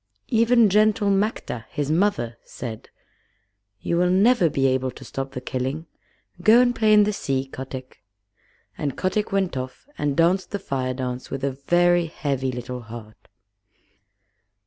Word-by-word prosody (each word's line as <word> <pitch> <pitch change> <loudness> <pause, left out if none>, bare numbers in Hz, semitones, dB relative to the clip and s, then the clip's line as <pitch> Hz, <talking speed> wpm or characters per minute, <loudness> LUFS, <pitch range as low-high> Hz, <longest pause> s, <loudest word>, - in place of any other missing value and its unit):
Even 230 -1 +4
gentle 210 0 +3
Matkah, 195 - -1
his 145 0 -2
mother, 160 - 0
said: 115 -4 -8 0.9
"You 170 - -1
will 180 +1 +3
never 190 0 +4
be 135 -2 0
able 130 0 +1
to - - -11
stop 135 0 -5
the 125 - -5
killing. 130 +5 -3 0.6
Go 220 +5 +6
and 245 -1 +3
play 220 -1 +3
in 210 0 +7
the 210 +1 0
sea, 135 -7 -2
Kotick." 130 -2 -9 0.8
And 140 -3 -2
Kotick 200 +3 -1
went 195 -5 0
off 130 - -6
and 145 -2 -1
danced 175 +3 +2
the 205 - -2
Fire 130 -8 -3
dance 125 -1 -4
with 135 0 -5
a 140 - +1 0.2
very 175 0 +4
heavy 135 -5 -2
little 125 0 -6
heart. 110 -1 -11
150 Hz, 150 wpm, -23 LUFS, 130-200 Hz, 0.9 s, in